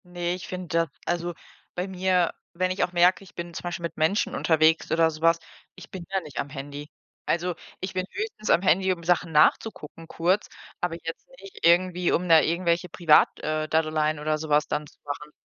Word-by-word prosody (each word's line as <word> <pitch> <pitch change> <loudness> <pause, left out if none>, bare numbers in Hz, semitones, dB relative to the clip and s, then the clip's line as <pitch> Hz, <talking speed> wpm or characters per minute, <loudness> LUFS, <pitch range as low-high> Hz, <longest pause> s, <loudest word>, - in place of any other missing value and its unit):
Ne, 175 0 -3
ich 180 0 -7
finde 185 -1 -6 0.2
d - - -31
also, 175 0 -2 0.4
bei 180 +2 -2
mir 185 -2 +1 0.2
wenn 185 +1 0
ich 185 - 0
auch - - -1
merke, 180 +2 +3
ich 190 - -17
bin 170 0 -7
zum - - -7
Beispiel 175 -1 -4
mit 170 - -4
Menschen 160 +6 +1
unterwegs 160 -1 +3
oder 165 0 +4
so 155 -1 -9
was, 165 0 +4 0.4
ich - - -13
bin 185 -2 -7
da 195 0 0
nicht 150 -7 -12
am 140 - -3
Handy. 145 +1 -8 0.4
Also, 175 +1 0 0.2
ich 185 - -5
bin 185 - -1
höchstens 405 - -5
am 170 - +5
Handy, 190 0 +3
um 170 -2 -4
Sachen 170 -1 +1
nachzugucken 160 0 +1
kurz, 180 +5 0 0.3
aber 175 -2 -1
jetzt 165 +1 -7
nicht 195 -3 -7
irgendwie, 180 +1 +3
um 180 - 0
da 165 -2 +7
irgendwelche 170 +1 0
Privat 165 -2 +5
äh, 155 0 -2
Daddeleien 155 -1 +1
oder 155 +1 0
so 155 0 -7
was 150 0 +3
dann 150 - -2
zu - - -19
machen. 150 +1 -6
170 Hz, 205 wpm, -26 LUFS, 155-180 Hz, 0.4 s, da